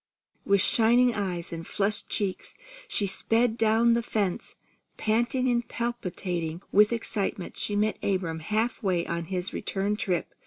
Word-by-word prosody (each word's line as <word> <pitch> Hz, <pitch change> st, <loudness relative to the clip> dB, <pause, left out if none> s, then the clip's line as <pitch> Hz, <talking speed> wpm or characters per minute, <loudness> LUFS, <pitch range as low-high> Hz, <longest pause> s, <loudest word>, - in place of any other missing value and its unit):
With 200 Hz, -1 st, +3 dB
shining 240 Hz, +2 st, +4 dB
eyes 180 Hz, -5 st, -3 dB
and 165 Hz, 0 st, -6 dB
flushed 210 Hz, +1 st, 0 dB
cheeks, 200 Hz, -4 st, -2 dB, 0.3 s
she 205 Hz, -, +2 dB
sped 225 Hz, +4 st, +3 dB
down 225 Hz, +1 st, +3 dB
the 235 Hz, -, +2 dB
fence. 205 Hz, -5 st, -2 dB, 0.4 s
Panting 235 Hz, +4 st, +1 dB
and 240 Hz, -1 st, +1 dB
palpitating 180 Hz, -8 st, -3 dB
with 210 Hz, +2 st, +5 dB
excitement, 205 Hz, -5 st, -3 dB
she 205 Hz, -, -2 dB
met 215 Hz, +1 st, 0 dB
Abram 180 Hz, -5 st, -1 dB
half 215 Hz, +8 st, -1 dB
way 180 Hz, -4 st, 0 dB
on 170 Hz, 0 st, -3 dB
his 180 Hz, +1 st, -3 dB
return 200 Hz, +1 st, -1 dB
trip. 180 Hz, -5 st, -2 dB
205 Hz, 145 wpm, -27 LUFS, 185-230 Hz, 0.4 s, with